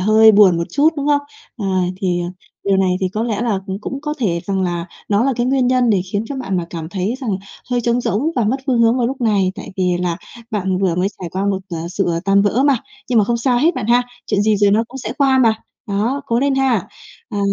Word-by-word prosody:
hơi 220 +3 +6
buồn 200 -4 +6
một 170 - -1
chút, 290 +2 +4
đúng 285 0 -2
không? 290 -1 +3 0.4
Ờ, 205 - -4 0.3
thì, 180 -2 -1
à, 175 - -3 0.4
điều 195 -1 +3
này 185 -1 +2
thì 190 - +1
có 215 +4 -3
lẽ 225 -3 -1
là 225 -5 0
cũng 190 +1 -4
cũng 270 +5 -5
có 300 +1 -3
thể 180 -9 0
rằng 195 -1 0
là 175 -1 -2 0.2
nó 205 +3 +2
là 275 - +2
cái 240 0 0
nguyên 260 -1 +2
nhân 250 -1 +3
để 200 -3 +3
khiến 205 +2 0
cho 280 - -4
bạn 195 -8 -2
mà 175 - -2
cảm 165 -2 -5
thấy 190 +5 -2
rằng 250 -5 -2 0.4
hơi 245 -1 +1
trống 235 +1 +1
rỗng 245 - 0
và 240 - +2
mất 235 +6 +1
phương 250 -4 +2
hướng 230 +1 +4
vào 240 - +2
lúc 265 +2 -4
này, 200 -5 +2
tại - - -9
vì 180 -2 +1
là 175 -2 -1 0.3
bạn 190 -4 -1
vừa 190 -3 +1
mới 180 +3 +1
trải 175 - -4
qua 190 +2 -1
một, 200 -1 +1
ờ, 170 - -3
sự, 195 +2 -1
ờ, 170 -1 0
tan 200 +1 +4
vỡ 210 +6 +2
mà. 280 -2 +4 0.3
Nhưng 245 -2 +3
mà 210 - +4
không 235 +3 0
sao 240 +1 +1
hết 325 +7 +3
bạn - - -3
ha, 240 +2 +4 0.2
chuyện 200 - +1
gì 215 0 +3
rồi 205 0 +3
nó 220 +3 +3
cũng 265 - -8
sẽ 265 - -4
qua 270 -2 +4
mà. 230 -4 +4 0.3
Đó, 225 +8 -1
cố 230 - +1
lên 280 0 +2
ha! 260 -7 +1 0.4
Ờ. 210 - -4
215 Hz, 270 wpm, -18 LUFS, 190-250 Hz, 0.4 s, hơi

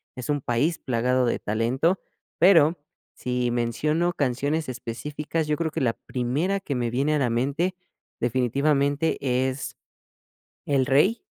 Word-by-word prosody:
es 125 0 -7
un 145 -1 +1
país 130 +8 0
plagado 125 +1 +1
de 120 - +1
talento, 125 - +1 0.4
pero 170 -2 +6 0.4
si 125 -1 -1
menciono 150 +9 0
canciones 145 +3 -1
específicas, 145 +6 -4
yo 150 - +1
creo 160 0 -2
que - - -3
la 120 -3 +2
primera 140 +14 -1
que 150 -8 -4
me 120 -1 -1
viene 140 +6 +1
a - - +1
la 130 -3 +1
mente 140 +10 0 0.4
definitivamente 140 +5 +1
es 130 0 -1 0.9
El 135 -3 +2
Rey, 165 - +3
140 Hz, 135 wpm, -25 LUFS, 125-155 Hz, 0.9 s, pero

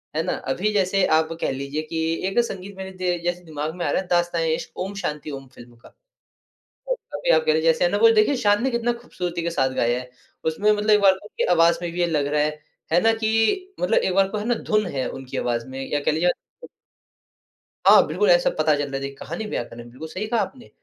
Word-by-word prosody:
है - - +1
ना। - - -1 0.2
अभी 210 +9 0
जैसे 195 -1 +2
आप 160 0 0
कह - - 0
लीजिये 140 +3 -3
कि 165 - -2 0.3
एक 195 +5 +1
संगीत 195 0 -7
मेरे 190 0 -6
दे 180 -1 0
जैसे 175 0 -2
दिमाग 155 0 -5
में 175 - -3
आ 145 - 0
रहा - - +1
है 185 - -11
दास्तान-ए-इश्क 170 -2 0
ओम 190 +2 -3
शांति 150 -1 -4
ओम 135 -1 -8
फिल्म 120 0 -14
का। 115 - -19 1.2
अभी - - -3
आप - - +3
कह 470 - +4
लीजिए - - +4
जैसे - - +1
ना - - 0
वो 455 - +6
देखिये 430 -10 +3
शान 205 0 +2
ने 265 - +2
कितना 235 0 0
खूबसूरती 175 -6 -4
के 170 - -1
साथ 135 -5 +1
गाया 120 +1 +1
है। 125 0 -10 0.4
उसमे 200 +7 +2
मतलब 210 +1 0
एक 210 -1 +6
बार 195 -1 +6
उनकी 205 +3 -5
आवाज़ 170 0 +5
में 170 -1 -3
भी 175 - -6
ये 175 - +3
लग 150 -3 0
रहा 150 0 +1
है, 150 - +2 0.4
है 175 - +6
ना 225 0 +4
कि 225 - 0
मतलब 180 - +2
एक 185 - 0
बार 195 0 +4
को 210 - -3
है 210 - -4
ना 240 - +2 0.2
धुन 215 -1 +3
है 130 - -1
उनकी 135 -1 -7
आवाज 120 -1 -1
में। 130 +1 -7
या 145 - +1
कह 145 - +1
लीजिए 170 +3 +2 1.6
हाँ, - - +8
बिल्कुल, 430 +3 +1
ऐसा - - +5
पता 155 - +3
चलता 145 -1 -3
है - - -1
देखिए 140 0 -5
कहानी 170 +9 -6
बयाँ 120 - -2
कर - - -13
रहे, 120 - -9
बिल्कुल 140 +6 -9
सही 185 +6 -4
कहा 230 0 0
आपने। 255 -3 -7
175 Hz, 240 wpm, -23 LUFS, 150-215 Hz, 1.6 s, हाँ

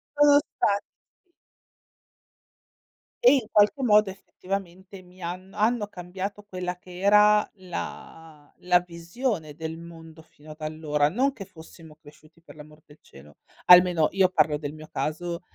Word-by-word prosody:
Sono 290 0 +6
spa 205 -8 -1 2.4
E, 485 - +8
in 260 -6 0
qualche 210 +7 +3
modo, 210 -3 +4
effettivamente, 190 0 -8
mi 180 +1 -19
hanno 185 +3 -7
hanno 215 0 +1
cambiato 190 +2 -7
quella 180 -3 -5
che 180 0 -13
era 210 +2 +4
la 165 -4 -9
la 180 0 +3
visione 170 - -5
del 160 0 -6
mondo 165 -1 -13
fino 155 -1 -17
ad 155 - -14
allora, 155 -1 -1
non 260 - 0
che 205 -7 -9
fossimo 160 -2 -15
cresciuti, 155 +2 -20
per 165 - -16
l'amor 150 0 -15
del 145 +1 -20
cielo 75 +2 -17 0.3
almeno, 180 -3 +6
io 190 -1 +3
parlo 155 -4 +2
del 145 -1 -6
mio 155 0 -12
caso, 170 +5 -4
180 Hz, 140 wpm, -25 LUFS, 155-200 Hz, 2.4 s, E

